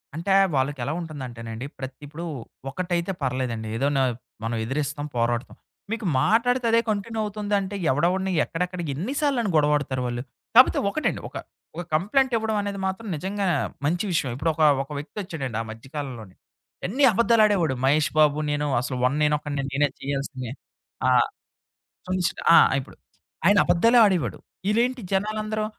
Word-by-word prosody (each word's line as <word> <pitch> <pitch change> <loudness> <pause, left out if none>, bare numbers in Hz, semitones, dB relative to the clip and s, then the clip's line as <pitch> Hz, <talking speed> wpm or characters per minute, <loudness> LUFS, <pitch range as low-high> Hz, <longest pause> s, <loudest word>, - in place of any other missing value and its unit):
అంటే, 175 +5 0 0.2
వాళ్ళకి 135 +1 0
ఎలా 145 - -2
ఉంటుందంటేనండి. 125 -7 -7
ప్రత్ 130 0 -6
ఇప్పుడు 160 +4 -8 0.5
ఒకటైతే 175 +3 -2
పర్లేదండి. 125 -4 -2
ఏదో 135 +4 +1
న - - +3 0.4
మనం 115 +1 -2
ఎదిరిస్తాం 145 +4 -2
పోరాడతాం. 120 +1 -1 0.4
మీకు 225 -1 -3 0.2
మాట్లాడితే 245 +3 +2
అదే 230 - +5
కంటిన్యూ 215 +2 -2
అవుతుందంటే, 205 -1 -2 0.2
ఎవడవడిని 180 +7 +1
ఎక్కడెక్కడ 180 +2 -3
ఎన్ని 180 - -3
సార్లుని 245 -8 +1
గొడవాడతారు 145 -3 +2
వాళ్ళు. 120 0 -3 0.3
కాకపోతే 255 +2 +7
ఒకటండి. 310 +9 -1
ఒక, - - -20 0.4
ఒక 175 - -3
కంప్లయింటివ్వడం 220 - +1
అనేది 200 -1 -4
మాత్రం 190 +4 -4
నిజంగా 195 +5 -2 0.4
మంచి 175 +6 +1
విషయం. 150 -5 0
ఇప్పుడు 155 +5 0
ఒక 160 - -4 0.2
"ఒక 140 - -15
వ్యక్తొచ్చాడండి" 150 - -5
ఆ - - -3
మధ్య 115 +4 -10
కాలంలోనే. 120 -10 -6 0.5
ఎన్ని 260 +9 0
అబద్ధాలుడేవాడు, 210 - +3
మహేష్ 145 +2 +3
బాబు 150 -1 +4
నేను 145 0 0
అసలు 130 0 -3
'1 130 +2 +2
నేనొక్కడినే' 150 -1 0
నేనే 145 +2 +2
తీయాలసిందే. 135 -3 -4 0.6
ఆ! - - +5 1.0
చంచ్ 185 -1 +1 0.2
ఆ! - - +10 0.2
ఇప్పుడు. 130 - -12 0.5
"ఆయన 205 0 +6
అబద్ధలే 230 +8 +4
ఆడేవాడు". 190 -6 +1 0.3
ఇలేేంటి 245 +3 +1
జనాలందరూ 215 +2 -1
165 Hz, 140 wpm, -25 LUFS, 135-210 Hz, 1.0 s, ఆ